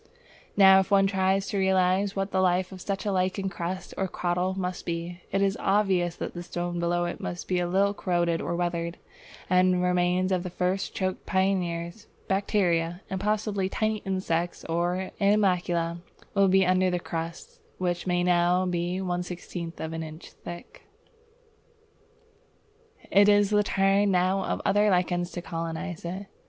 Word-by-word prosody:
Now 190 -1 +8
if 190 - -1
one 195 -1 +5
tries 190 0 +1
to 200 - -1
realize 190 +1 +2
what 195 0 -2
the 190 - +2
life 185 0 +1
of 185 -1 -9
such 200 +3 -3
a 205 - 0
lichen 190 +1 0
crust 185 0 -5
or 190 - +1
crottle 180 +1 -1
must 180 -1 -3
be, 170 +1 -4
it 195 +1 +1
is 195 0 +1
obvious 190 -4 +1
that - - -5
the 175 - -6
stone 175 0 -4
below 175 0 0
it 175 - -4
must 175 - -5
be 180 -1 +1
a 175 - 0
little 195 +3 +2
corroded 175 -4 0
or 170 - -2
weathered, 170 -1 -2 0.5
and 180 0 +3
remains 180 +1 +1
of 185 -1 +1
the 180 - -5
first 180 +2 -2
choked 185 -1 -3
pioneers, 190 0 -1 0.2
bacteria, 180 -3 +1
and 190 -1 -2
possibly 205 -2 0
tiny 215 +2 0
insects 180 -4 -2
or 175 +3 -1
animalcula 180 -4 +2 0.3
will 200 -1 +4
be 190 0 +4
under 185 0 +3
the 180 0 -1
crust, 165 0 -6 0.2
which 175 0 -2
may 175 -1 +1
now 180 +1 +3
be 175 0 -1
one 180 -1 -1
sixteenth 175 -1 -7
of 160 0 -4
an 160 - -4
inch 155 +1 -9
thick. 175 0 -10 2.3
It 200 +1 +6
is 205 0 +4
the 210 0 +4
turn 195 0 +2
now 185 +1 +2
of - - -2
other 205 +2 +3
lichens 175 -1 +1
to 175 - -5
colonize 165 +1 -5
it. 185 +4 -5
185 Hz, 165 wpm, -27 LUFS, 175-195 Hz, 2.3 s, Now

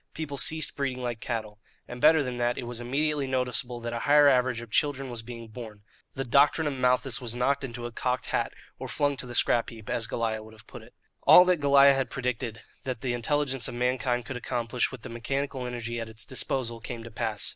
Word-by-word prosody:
People 145 -3 -4
ceased 160 -1 +3
breeding 135 -3 -2
like 120 -2 -3
cattle. 110 -3 -4 0.3
And 125 0 -8
better 155 0 +6
than 125 -2 -4
that, 120 0 0
it 130 - -4
was 120 0 -6
immediately 145 +3 0
noticeable 125 -2 -2
that 115 0 -4
a 120 - -2
higher 145 +3 +5
average 125 -3 +3
of 120 -2 -10
children 135 -2 0
was 120 -1 -5
being 115 0 -9
born. 110 -2 -10 0.3
The 135 - -2
doctrine 145 +5 +4
of 145 - 0
Malthus 130 0 +1
was 120 -1 -3
knocked 135 +3 +1
into 120 -2 -5
a 120 - -5
cocked 125 +2 -2
hat - - -1 0.3
or - - -5
flung 145 -1 0
to 125 - -5
the 120 - -7
scrap 120 -1 +2
heap, 110 -2 -9
as 115 -2 -1
Goliah 110 -2 -2
would 110 0 -13
have 110 - -17
put - - -11
it. - - -18 0.3
All 180 - +8
that 180 -1 +3
Goliah 140 -1 +6
had 135 -1 -1
predicted 125 -4 -3 0.2
that 125 -3 -4
the 125 -2 -1
intelligence 135 +1 0
of - - -6
mankind 125 -1 0
could 130 - -5
accomplish 120 0 -1
with 130 -4 -10
the 130 - -7
mechanical 130 +2 -3
energy 120 -1 -4
at 115 -1 -5
its 110 +1 -1
disposal, 125 -2 -1
came 115 +1 -7
to 115 - -10
pass. 110 -2 -2
125 Hz, 225 wpm, -27 LUFS, 115-135 Hz, 0.3 s, All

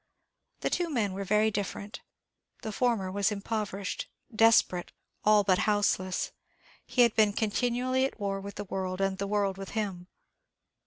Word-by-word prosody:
The - - -1
two 350 -1 0
men 220 -10 0
were 200 +1 -4
very 210 +2 +3
different. 205 0 -4 0.6
The 220 - -3
former 215 -4 0
was 200 +2 +1
impoverished, 205 -1 -3 0.3
desperate, 215 -5 +4 0.3
all 210 -1 +5
but 185 -2 +3
houseless; 195 -3 +1 0.6
he 250 - +4
had 235 -2 +3
been 215 -2 +4
continually 245 +4 0
at 270 - -5
war 195 -1 -2
with 200 0 -8
the 205 - -4
world, 185 -1 -3
and 195 0 0
the 200 - -1
world 200 -2 0
with 195 - -6
him. 190 -5 -3
205 Hz, 155 wpm, -29 LUFS, 195-220 Hz, 0.6 s, all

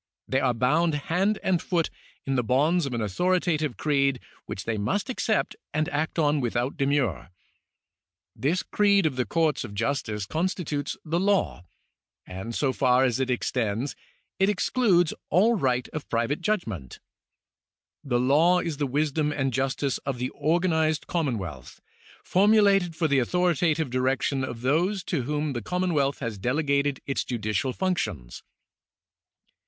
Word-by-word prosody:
They 130 - +1
are 125 -3 +1
bound 150 +7 +2
hand 185 +8 0
and 180 -3 +1
foot 170 -3 0 0.3
in 135 - -1
the 125 - +2
bonds 145 +7 +2
of 130 - -5
an 115 - -2
authoritative 155 - 0
creed 140 -3 +1 0.3
which 95 - -6
they 115 - -1
must 130 - -1
accept 220 -3 0 0.2
and 155 0 +1
act 155 +1 -2
on 150 -2 +2
without 120 +2 -1
demur. 135 -9 0 1.1
This 165 +7 0
creed 200 -3 +3
of 150 -4 0
the 125 -1 0
com 160 -2 +2
ts - - -5
of 100 - -8
justice 110 -3 -2
constitutes 160 - -2
the 165 +2 0
law, 195 - +1 0.6
and 95 +6 -6
so 135 -3 +1
far 130 -1 +3
as 125 -2 +1
it 130 -1 0
extends, 125 0 -1 0.4
it 195 +1 +4
excludes 200 -4 +2 0.2
all 205 +8 +4
right 125 - 0
of 155 - -7
private 120 +7 0
judgment. 110 - -3 1.0
The 125 -4 0
law 150 +8 +4
is 165 -5 -3
the 145 -1 -1
wisdom 150 +2 0
and 135 -3 -1
justice 135 +1 -1
of 135 -3 -4
the 125 +1 -2
organized 160 0 +1
commonwealth, 105 - -3 0.4
formulated 195 -3 +4
for 160 0 +1
the 140 -2 +3
authoritative 160 0 +1
direction 130 +1 0
of 120 -3 -5
those 175 +9 +1
to 165 -7 -1
whom 150 +1 -1
the 120 - -3
commonwealth 150 - 0
has 115 -5 -4
delegated 140 +3 0
its 135 - -1
judicial 110 0 -2
functions. 105 - -3
145 Hz, 150 wpm, -26 LUFS, 125-170 Hz, 1.1 s, it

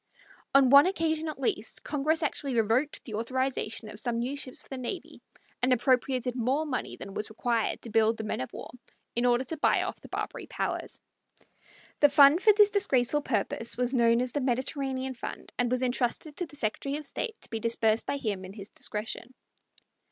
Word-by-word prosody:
On 270 -2 +6
one 280 +4 +9
occasion, 320 -4 0
at 305 - -7
least, 230 -4 -2
Congress 305 +3 0
actually 280 -3 -2
revoked 235 +7 0
the 225 - -8
authorization 230 -1 -2
of 210 0 -9
some 235 0 -1
new 250 +4 -2
ships 265 -3 -2
for - - -8
the 270 - -5
navy, 255 +9 -6 0.4
and 250 +1 +2
appropriated 255 0 +2
more 260 +6 0
money 270 -4 -3
than 195 - -8
was 210 - -4
required 230 0 -1
to 230 - -7
build 225 +1 +3
the 220 - -4
men 215 - -3
of 130 - -5
war - - -8 0.4
in 240 +1 +2
order 245 +1 +3
to 320 +5 -5
buy - - +3
off - - -5
the - - -13
Barbary - - -5
powers. - - -3 1.0
The 290 - +6
fund 285 +4 +7
for 430 - +7
this 415 0 +5
disgraceful 295 - +2
purpose 230 -2 -1
was 250 +1 0
known 235 -1 +4
as 250 0 -2
the 290 - -1
"Mediterranean 260 +1 -1
fund," 245 - -8
and 245 -1 +2
was 255 +1 +1
intrusted 255 +4 -1
to 355 - -2
the 300 - -11
Secretary 275 +3 -2
of 300 - -8
State 455 - -4
to - - -8
be 225 - -2
disbursed 225 -1 +1
by 280 - -1
him 205 -8 -3
in 185 +1 -9
his 200 -1 -9
discretion. 230 +4 -4
255 Hz, 195 wpm, -28 LUFS, 230-285 Hz, 1.0 s, one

